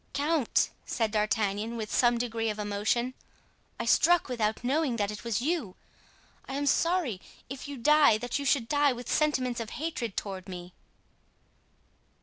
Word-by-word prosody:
"Count!" 295 -3 +1
said 225 -2 -1
D'Artagnan, 215 +1 0
with 215 -2 -5
some 240 -1 +4
degree 230 -1 -1
of 210 - -3
emotion, 210 +4 -1 0.7
"I - - -2
struck 350 -4 +4
without 220 -2 -1
knowing 275 0 +1
that 205 -2 -1
it 210 - -8
was 235 0 -1
you. 295 - -1 0.7
I 270 - -4
am 285 +1 -1
sorry, 300 - +1 0.3
if 270 +1 -6
you 285 -1 -6
die, 295 -2 +5
that 245 +5 -3
you - - -3
should 275 -4 +2
die 290 -1 +3
with 245 0 -8
sentiments 260 -6 +1
of 225 -2 -4
hatred 265 - -4
toward 190 -2 -5
me." 180 -1 -8
240 Hz, 155 wpm, -29 LUFS, 215-285 Hz, 0.7 s, die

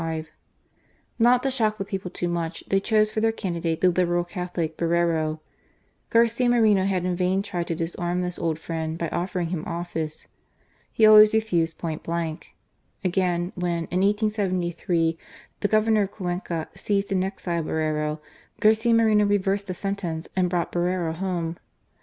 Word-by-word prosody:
Not 245 +2 +5
to 270 - +1
shock 220 -5 0
the 195 - -3
people 190 -2 -4
too 175 0 -3
much, 170 -1 -3
tiiey 195 0 +1
chose 215 -1 +3
for 215 - -1
their 225 0 +3
candidate 170 -6 -3
the 185 - +5
Liberal 175 0 +1
Catholic, 175 -2 -4
Borrero. 165 -2 0 0.7
Garcia 235 +1 +3
Moreno 215 -5 +4
had 185 -2 0
in 180 -1 0
vain 185 +2 +1
tried 175 -4 -3
to 165 - -1
disarm 175 +2 -2
this 180 0 -4
old 165 -2 -1
friend 160 0 -4
by 170 -1 -2
offering 175 0 -2
him 170 -3 -3
office. 170 -3 -4 0.7
He 220 - +4
always 215 0 +8
refused 175 -7 +1
point 160 -2 -4
blank. 165 -1 -4 0.5
Again, 180 -1 0
when, 175 -2 -1
in 180 +1 +1
1873, 185 -5 0 0.4
the - - +1
Governor 215 0 +3
of 200 -1 -1
Cuenca 175 -4 -3
seized 200 -1 -1
and 185 -1 +2
exiled 175 -4 -3
Borrero, 155 -1 -1 0.4
Garcia 220 +2 +4
Moreno 215 -2 +4
reversed 200 0 +1
the 185 - -4
sentence 180 -5 -3
and 185 -1 +2
brought 175 -1 -1
Borrero 175 -1 0
home. 170 -2 -3
180 Hz, 155 wpm, -25 LUFS, 170-205 Hz, 0.7 s, always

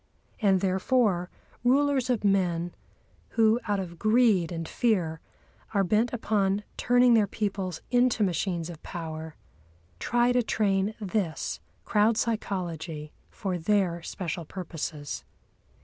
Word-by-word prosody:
And 195 -3 +4
therefore 190 -1 +1 0.3
rulers 265 0 +3
of 240 -4 +1
men, 175 -4 +1 0.6
who, 225 +1 +5
out 205 -1 +1
of 170 -3 -6
greed 215 -6 +3
and 165 -1 -4
fear, 180 -9 0 0.6
are 200 - +4
bent 215 +6 +2
upon 205 -4 0
turning 245 0 +4
their 215 -3 +4
peoples 195 -4 -3
into 245 -3 +3
machines 175 -2 -1
of 160 - -11
power, 160 -2 -6 0.6
try 240 - +2
to 245 0 +3
train 205 -2 +1
this 195 -5 -2 0.3
crowd 215 +1 +3
psychology 170 -9 -3 0.2
for 185 -3 -3
their 175 -1 +1
special 175 0 -4
purposes. 160 -4 -5
195 Hz, 115 wpm, -27 LUFS, 170-220 Hz, 0.6 s, who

